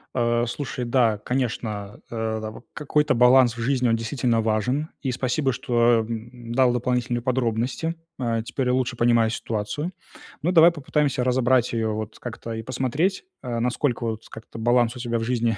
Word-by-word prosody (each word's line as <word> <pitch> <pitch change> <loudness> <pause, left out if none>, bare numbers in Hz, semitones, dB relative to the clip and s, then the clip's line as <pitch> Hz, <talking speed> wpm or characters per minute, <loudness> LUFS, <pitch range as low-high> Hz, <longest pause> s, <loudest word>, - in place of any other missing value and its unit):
Э, 120 -1 +2
слушай, 125 0 -4
да, 120 -3 +2
конечно, 110 -4 -3
э, 110 -1 -2
там, 110 +2 -8
какой-то 150 -1 +1
баланс 125 0 +5
в - - -7
жизни, 125 -1 +1
он, 115 - +3
действительно, 115 0 0
важен, 115 +8 0
и 130 - -1
спасибо, 130 +2 0
что, 120 -1 +2
э, - - -7
м, 115 +1 -7
дал 130 -1 +4
дополнительные 125 0 0
подробности. 130 +5 -1 0.2
Э, 115 -3 -1
теперь 130 0 -2
я 125 - +2
лучше 130 -1 0
понимаю 115 -1 +3
ситуацию. 115 - -3 0.5
Ну, 175 - +2
давай 170 -1 +7
попытаемся 145 -4 0
разобрать 125 -1 +2
ее, 115 -1 0
вот, 110 0 -6
как-то, 115 -1 -7
и 115 - -4
посмотреть, 130 - -1 0.2
э, 120 -3 -3
насколько, 125 +1 0
вот, 110 -1 -3
с - - -17
как-то 110 0 -10
баланс 120 +1 +2
у - - -8
тебя 120 -1 -1
в 115 - -2
жизни 115 -2 0
120 Hz, 175 wpm, -24 LUFS, 115-130 Hz, 0.5 s, давай